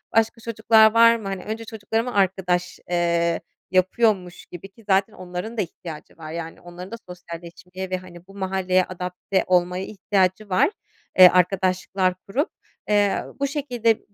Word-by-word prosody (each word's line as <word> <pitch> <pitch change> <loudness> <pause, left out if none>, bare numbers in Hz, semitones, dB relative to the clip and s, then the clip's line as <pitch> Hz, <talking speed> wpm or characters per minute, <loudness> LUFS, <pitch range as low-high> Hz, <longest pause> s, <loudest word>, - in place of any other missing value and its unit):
başka 225 +1 +2
çocuklar 220 -1 +4
var 230 0 +7
mı? 220 -3 -6
Hani, 195 -1 -4
önce 220 +2 -5
çocuklarıma 225 +2 -3
arkadaş, 185 -2 0
eee, 170 -1 +1 0.3
yapıyormuş 185 -1 +1
gibi, 180 +2 -10
ki 225 +4 -20
zaten 195 +2 +3
onların 185 +5 -6
da 210 - +2
ihtiyacı 165 -3 -8
var, 155 -1 -8
yani 165 0 -6
onların 175 +2 -10
da - - -4
sosyalleşmeye 180 +1 -9
ve, 185 - -1
hani, 180 -1 -13
bu 195 - -15
mahalleye 190 -1 +1
adapte 180 +1 -2
olmaya 180 0 +2
ihtiyacı 195 0 0
var, 265 - +3 0.5
eee, 185 - +12
arkadaşlıklar 185 +1 +1
kurup. 275 - 0 0.4
Eee, 205 -1 +2 0.2
bu 280 - +1
şekilde 245 -6 0
190 Hz, 150 wpm, -23 LUFS, 180-220 Hz, 0.5 s, eee